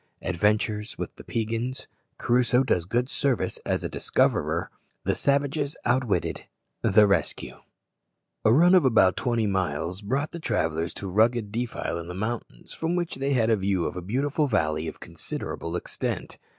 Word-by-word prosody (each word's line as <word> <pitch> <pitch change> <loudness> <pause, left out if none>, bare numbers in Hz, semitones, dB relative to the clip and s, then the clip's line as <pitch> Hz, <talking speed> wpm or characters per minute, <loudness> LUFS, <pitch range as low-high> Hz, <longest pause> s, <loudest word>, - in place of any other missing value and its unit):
Adventures 105 +3 0
with - - -5
the - - -12
Peigans 115 +3 -2 0.3
Crusoe 125 +1 +3
does 90 -10 +1
good 120 +6 0
service 140 -4 -1
as - - 0
a - - 0
discoverer - - 0 0.3
The - - +1
savages 140 +1 0
outwitted 120 -7 0 0.4
The 105 -1 +5
rescue. 100 -1 0 0.9
A 110 - +5
run 170 +9 +6
of 120 - +5
twenty 120 -3 0
miles 90 -2 -1
brought 135 +9 -1
the 170 - -6
travellers 80 - -1
to 100 - -5
a - - -5
rugged 110 +1 +2
defile 115 -6 -3
in 85 - -7
the 90 - -6
mountains, 110 - -5
from 165 +2 -1
which 175 -4 -2
they 135 +1 0
had 115 -3 +3
a - - +5
view 95 -3 0
of - - -3
a 90 - -4
beautiful 140 - 0
valley 80 - 0
of - - -7
considerable 85 +1 -5
extent. - - -4
110 Hz, 160 wpm, -26 LUFS, 95-130 Hz, 0.9 s, run